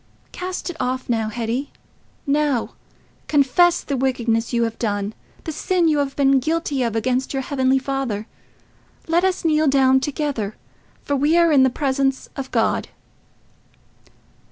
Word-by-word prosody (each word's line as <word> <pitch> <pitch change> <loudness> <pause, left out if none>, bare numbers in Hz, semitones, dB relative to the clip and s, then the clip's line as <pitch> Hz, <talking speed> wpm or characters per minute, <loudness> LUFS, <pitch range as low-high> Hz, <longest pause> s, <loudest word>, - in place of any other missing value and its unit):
Cast 365 0 -4
it 330 - -13
off 255 0 -2
now, 225 -2 0
Hetty—now: 265 +3 -3 0.5
confess 310 +5 +3
the 280 - -2
wickedness 240 -3 0
you 235 -1 +1
have 230 -1 -3
done—the 205 +7 -4
sin 345 +2 +1
you 305 -2 +2
have 275 -1 -2
been 275 -1 +4
guilty 310 -1 -1
of 230 -2 -1
against 255 +4 0
your 265 - -1
Heavenly 265 -1 +1
Father. 265 -6 -3 0.8
Let 335 +2 +2
us 375 -2 0
kneel 310 -1 +3
down 265 -1 +4
together, 265 -7 -3 0.5
for 285 - -1
we 295 +5 +2
are 340 -1 +4
in 280 -3 +5
the 260 - +5
presence 270 0 -1
of 270 -2 -5
God." - - 0
270 Hz, 140 wpm, -21 LUFS, 245-300 Hz, 0.8 s, in